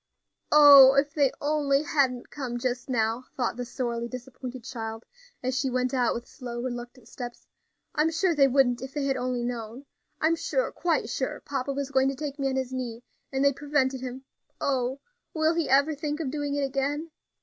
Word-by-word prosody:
"Oh! 280 Hz, -3 st, +9 dB
if 280 Hz, +1 st, +2 dB
they 280 Hz, -3 st, +3 dB
only 290 Hz, -1 st, +1 dB
hadn't 270 Hz, -5 st, 0 dB
come 255 Hz, -5 st, -4 dB
just 245 Hz, +1 st, -3 dB
now," 230 Hz, 0 st, 0 dB
thought 245 Hz, -3 st, 0 dB
the 245 Hz, -, -4 dB
sorely 235 Hz, -2 st, -3 dB
disappointed 255 Hz, 0 st, -8 dB
child, 225 Hz, -2 st, -6 dB, 0.4 s
as 255 Hz, 0 st, -1 dB
she 270 Hz, 0 st, 0 dB
went 255 Hz, +1 st, 0 dB
out 250 Hz, -2 st, +2 dB
with 235 Hz, 0 st, -5 dB
slow, 240 Hz, -1 st, -7 dB
reluctant 245 Hz, -1 st, -6 dB
steps. 240 Hz, 0 st, -8 dB, 0.5 s
"I'm 305 Hz, +1 st, +2 dB
sure 340 Hz, +2 st, +1 dB
they 280 Hz, -3 st, +5 dB
wouldn't, 250 Hz, -2 st, +3 dB
if 265 Hz, +2 st, -8 dB
they 290 Hz, -2 st, -1 dB
had 270 Hz, -1 st, +1 dB
only 250 Hz, -1 st, -2 dB
known. 240 Hz, +2 st, -5 dB, 0.3 s
I'm 320 Hz, +1 st, +3 dB
sure, -, -, -1 dB
quite 330 Hz, -9 st, 0 dB
sure 260 Hz, +3 st, -3 dB
papa 275 Hz, -1 st, -2 dB
was 280 Hz, 0 st, -3 dB
going 265 Hz, 0 st, +3 dB
to 275 Hz, -, -3 dB
take 290 Hz, 0 st, -5 dB
me 275 Hz, -1 st, +1 dB
on 265 Hz, -, -2 dB
his 260 Hz, -1 st, -2 dB
knee, 245 Hz, -2 st, -4 dB, 0.3 s
and 270 Hz, +1 st, +1 dB
they 280 Hz, -, +5 dB
prevented 270 Hz, -2 st, 0 dB
him. 260 Hz, +1 st, -6 dB, 0.4 s
Oh! 265 Hz, 0 st, -1 dB, 0.3 s
will 315 Hz, +1 st, +3 dB
be 335 Hz, -1 st, -1 dB
ever 280 Hz, +4 st, +4 dB
think 295 Hz, +1 st, -3 dB
of 290 Hz, -5 st, -2 dB
doing 290 Hz, -1 st, -2 dB
it 285 Hz, -, 0 dB
again! 280 Hz, +4 st, -2 dB
265 Hz, 195 wpm, -27 LUFS, 245-285 Hz, 0.5 s, Oh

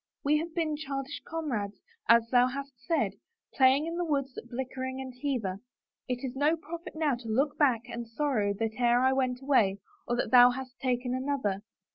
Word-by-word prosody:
We 300 Hz, +2 st, +3 dB
have 330 Hz, +1 st, -6 dB
been 315 Hz, -3 st, 0 dB
childish 275 Hz, -1 st, -5 dB
comrades, 240 Hz, -12 st, -3 dB, 0.3 s
as 230 Hz, 0 st, +6 dB
thou 250 Hz, 0 st, +5 dB
hast 275 Hz, +2 st, -5 dB
said, 330 Hz, -, +1 dB, 0.4 s
playing 270 Hz, +3 st, +4 dB
in 335 Hz, +1 st, -4 dB
the 350 Hz, -, 0 dB
woods 280 Hz, -5 st, -1 dB
at 240 Hz, -, -9 dB
Blickling 260 Hz, +1 st, -4 dB
and 260 Hz, -1 st, -6 dB
Hever. 220 Hz, -10 st, -1 dB, 0.5 s
It 250 Hz, 0 st, -3 dB
is 255 Hz, 0 st, -5 dB
no 295 Hz, +4 st, +2 dB
profit 335 Hz, +1 st, -8 dB
now 310 Hz, -3 st, +1 dB
to 240 Hz, -2 st, -6 dB
look 275 Hz, +6 st, +1 dB
back 260 Hz, -7 st, +4 dB
and 235 Hz, -1 st, -6 dB
sorrow 230 Hz, -4 st, 0 dB
that 225 Hz, 0 st, -1 dB
e'er 240 Hz, 0 st, +4 dB
I 260 Hz, +1 st, +4 dB
went 255 Hz, -1 st, -1 dB
away 225 Hz, -9 st, +3 dB, 0.3 s
or 240 Hz, -, +1 dB
that 240 Hz, -, -1 dB
thou 245 Hz, -1 st, +9 dB
hast 260 Hz, +1 st, -6 dB
taken 250 Hz, -1 st, -1 dB
another. 255 Hz, -7 st, -1 dB
260 Hz, 190 wpm, -29 LUFS, 240-285 Hz, 0.5 s, thou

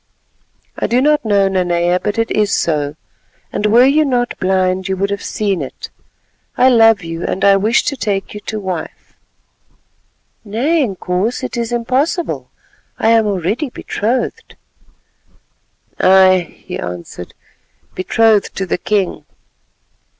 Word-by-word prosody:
"I -, -, 0 dB
do 240 Hz, -, +2 dB
not 300 Hz, +1 st, +2 dB
know, 200 Hz, -3 st, +2 dB
Nanea, 175 Hz, -1 st, +1 dB
but 210 Hz, +2 st, -3 dB
it 230 Hz, 0 st, 0 dB
is 210 Hz, -1 st, +1 dB
so, 150 Hz, -5 st, 0 dB, 0.6 s
and 210 Hz, -, 0 dB
were 235 Hz, +4 st, +6 dB
you 295 Hz, +3 st, +4 dB
not 245 Hz, -4 st, -1 dB
blind 185 Hz, 0 st, 0 dB
you 190 Hz, 0 st, -2 dB
would 200 Hz, +1 st, -1 dB
have 200 Hz, -, -3 dB
seen 200 Hz, -5 st, -2 dB
it. 135 Hz, -, -8 dB, 0.7 s
I 255 Hz, -, +5 dB
love 225 Hz, -5 st, +5 dB
you, 165 Hz, +1 st, -5 dB
and 195 Hz, +2 st, -1 dB
I 200 Hz, 0 st, +6 dB
wish 215 Hz, +4 st, +2 dB
to 280 Hz, -, -2 dB
take 205 Hz, -6 st, -3 dB
you 210 Hz, -, -6 dB
to 215 Hz, +1 st, -5 dB
wife." 185 Hz, -5 st, -6 dB, 1.3 s
"Nay, 255 Hz, +10 st, 0 dB
Inkoos, 195 Hz, 0 st, -2 dB
it -, -, -4 dB
is 235 Hz, 0 st, -3 dB
impossible. 260 Hz, +8 st, -1 dB, 0.5 s
I 220 Hz, -, +1 dB
am 225 Hz, -1 st, +4 dB
already 205 Hz, -, -1 dB
betrothed." 240 Hz, +1 st, -3 dB, 1.4 s
"Ay," 185 Hz, -2 st, +4 dB
he -, -, -5 dB
answered, 90 Hz, 0 st, -7 dB, 0.6 s
"betrothed 215 Hz, +2 st, +2 dB
to 195 Hz, -, -2 dB
the 180 Hz, -, -2 dB
king." 200 Hz, -2 st, -1 dB
205 Hz, 135 wpm, -16 LUFS, 185-235 Hz, 1.4 s, were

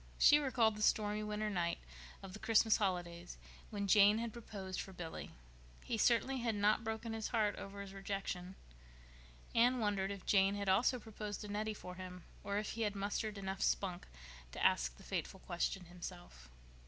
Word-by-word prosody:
She 295 Hz, -, +7 dB
recalled 240 Hz, -6 st, +2 dB
the -, -, -5 dB
stormy 210 Hz, 0 st, +2 dB
winter 210 Hz, 0 st, -2 dB
night 175 Hz, -3 st, 0 dB, 0.5 s
of 190 Hz, -1 st, -8 dB
the 210 Hz, -, -7 dB
Christmas 220 Hz, 0 st, +4 dB
holidays 175 Hz, -3 st, -2 dB, 0.3 s
when 205 Hz, -2 st, -2 dB
Jane 205 Hz, +1 st, +6 dB
had 230 Hz, -1 st, -3 dB
proposed 195 Hz, -5 st, -5 dB
for 195 Hz, -, -8 dB
Billy. 175 Hz, -3 st, -6 dB, 0.5 s
He -, -, -2 dB
certainly 245 Hz, +4 st, +3 dB
had 230 Hz, -2 st, 0 dB
not 205 Hz, +2 st, +3 dB
broken 225 Hz, +1 st, -3 dB
his 220 Hz, -1 st, -2 dB
heart 215 Hz, -3 st, +1 dB
over 200 Hz, 0 st, -7 dB
his 195 Hz, -1 st, -8 dB
rejection. 195 Hz, -2 st, -4 dB, 1.0 s
Anne 245 Hz, +2 st, +5 dB
wondered 205 Hz, -4 st, 0 dB
if 200 Hz, -2 st, -6 dB
Jane 195 Hz, 0 st, +4 dB
had 200 Hz, -1 st, -3 dB
also 225 Hz, +7 st, +4 dB
proposed 210 Hz, -2 st, -6 dB
to 210 Hz, -, -7 dB
Nettie 215 Hz, +1 st, -2 dB
for 180 Hz, -, -8 dB
him, 180 Hz, -1 st, -8 dB, 0.2 s
or 200 Hz, 0 st, -1 dB
if 210 Hz, 0 st, -2 dB
he 230 Hz, -, -4 dB
had 210 Hz, -2 st, 0 dB
mustered 205 Hz, +2 st, -2 dB
enough 190 Hz, -1 st, -4 dB
spunk 185 Hz, -3 st, 0 dB, 0.5 s
to -, -, -1 dB
ask 60 Hz, -1 st, +3 dB
the -, -, -14 dB
fateful 190 Hz, -, -3 dB
question 180 Hz, +1 st, -2 dB
himself. 175 Hz, -, -9 dB
205 Hz, 180 wpm, -37 LUFS, 190-220 Hz, 1.0 s, She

